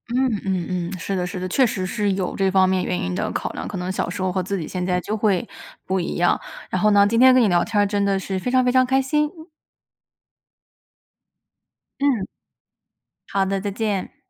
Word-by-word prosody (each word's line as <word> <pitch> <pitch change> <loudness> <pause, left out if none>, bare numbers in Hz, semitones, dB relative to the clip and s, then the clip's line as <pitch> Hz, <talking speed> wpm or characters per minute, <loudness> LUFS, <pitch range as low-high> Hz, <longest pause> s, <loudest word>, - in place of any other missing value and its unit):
嗯 255 -5 +1
嗯 185 -3 -1 0.3
嗯， - - -5
是 195 +4 -3
的 180 -1 -1
是 180 - -6
的， 185 0 -4
确 260 +6 +3
实 190 -4 -3
是 205 0 0
有 185 -2 -2
这 195 -1 +2
方 190 0 +4
面 185 -1 +1
原 180 - -1
因 90 - -2
的 - - -2
考 - - -3
量， - - -6
可 205 - -5
能 180 +1 -3
小 190 - -2
时 185 +2 -5
候 185 0 0
和 185 +1 -1
自 195 +2 -3
己 165 - -4
现 180 +3 -4
在 180 0 0
就 215 +4 -3
会 200 -4 +1 0.4
不 190 0 0
一 175 - -3
样。 175 0 +2 0.3
然 185 - -1
后 210 - +4
呢， 200 -1 +6
今 230 +3 +1
天 260 +1 +8
跟 255 -1 +5
你 215 - +3
聊 175 -1 +3
天 210 -2 +1
儿 - - +3
真 200 0 0
的 200 -1 +1
是 190 0 -3
非 250 - -3
常 255 0 +3
非 250 - +2
常 255 0 +4
开 265 +1 +2
心。 300 +3 +1 2.7
嗯。 265 -9 +1 1.0
好 195 -1 +1
的， 195 0 -1
再 205 +1 -3
见。 205 -2 -3
195 Hz, 245 characters per minute, -22 LUFS, 185-220 Hz, 2.7 s, 天